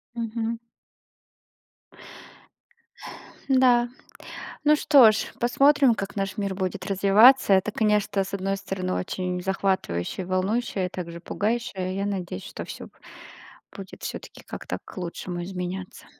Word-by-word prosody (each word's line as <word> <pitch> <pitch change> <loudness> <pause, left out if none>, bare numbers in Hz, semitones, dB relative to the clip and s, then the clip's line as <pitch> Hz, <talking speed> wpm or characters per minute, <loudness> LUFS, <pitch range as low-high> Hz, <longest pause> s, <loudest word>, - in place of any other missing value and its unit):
Мгм. 230 0 -3 2.9
Да. 250 -3 +4 0.7
Ну 300 +1 +5
что 275 -7 +7
ж, 215 - -3
посмотрим, 275 +1 +4
как 195 -1 -5
наш 195 0 -3
мир 200 -2 -2
будет 185 0 -3
развиваться. 200 +5 +6
Это, 190 +2 +2
конечно, 210 -2 +1
с 195 - -9
одной 195 0 -1
стороны, 185 -1 -3
очень 180 -1 -3
захватывающее 190 - -1
и - - -12
волнующее, 190 +1 0
и - - -9
также 170 -2 -7
пугающее. 200 -2 -2
Я 200 +1 -1
надеюсь, 185 - -4
что - - -7
всё - - -8
бу - - -16 0.8
будет 195 0 -10
всё-таки - - -7
как-то - - -6
к - - -14
лучшему 175 0 -5
изменяться. 185 0 -6
195 Hz, 125 wpm, -25 LUFS, 185-230 Hz, 2.9 s, что